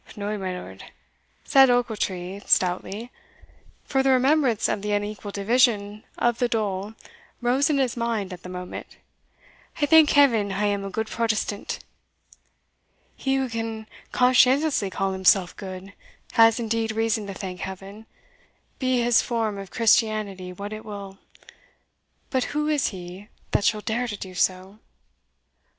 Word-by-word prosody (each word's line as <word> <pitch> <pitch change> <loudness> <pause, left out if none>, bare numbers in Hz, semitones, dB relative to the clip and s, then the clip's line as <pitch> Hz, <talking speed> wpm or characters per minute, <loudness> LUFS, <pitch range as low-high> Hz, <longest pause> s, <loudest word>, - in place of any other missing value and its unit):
"No, 210 0 -3
my 185 -3 -4
lord," - - -11 0.6
said 270 -2 +6
Ochiltree 200 -6 -1
stoutly; 195 +6 +1 0.7
for 270 - +1
the 270 - +2
remembrance 260 -2 +3
of 200 - -1
the 210 0 -2
unequal 205 0 -3
division 210 0 +1
of 240 -1 +1
the 245 - +2
dole 210 -2 -2 0.4
rose 255 +4 +2
in 295 - +2
his 260 -3 0
mind 230 -5 -2
at 180 - -10
the 180 - -9
moment; 180 0 -8 0.8
"I 295 - +3
thank 315 0 +6
Heaven 230 -8 +4
I 205 +2 0
am 200 -1 0
a 195 - -4
good 220 +3 -2
Protestant." 215 -2 -2 1.3
"He 270 0 -1
who 265 -1 0
can 225 -1 -4 0.3
conscientiously 255 -1 +3
call 195 +1 -1
himself 190 -1 +3
good, 190 0 -8 0.4
has 225 0 +5
indeed 225 -1 -1
reason 225 -1 0
to 195 - -6
thank 185 -2 -6
Heaven, 195 +3 -8 0.7
be 255 -2 +1
his 235 -1 +4
form 225 -4 -2
of 195 -1 -8
Christianity 215 -5 +1
what 200 +3 -7
it 215 - -7
will 200 -2 -8 1.1
But 260 -2 +1
who 300 0 0
is 300 -3 +1
he 185 +1 -8 0.2
that 205 - +1
shall 215 -1 +2
dare 235 +4 -2
to 210 -3 -5
do 185 -2 -8
so!" 185 +3 -1
215 Hz, 145 wpm, -24 LUFS, 195-240 Hz, 1.3 s, said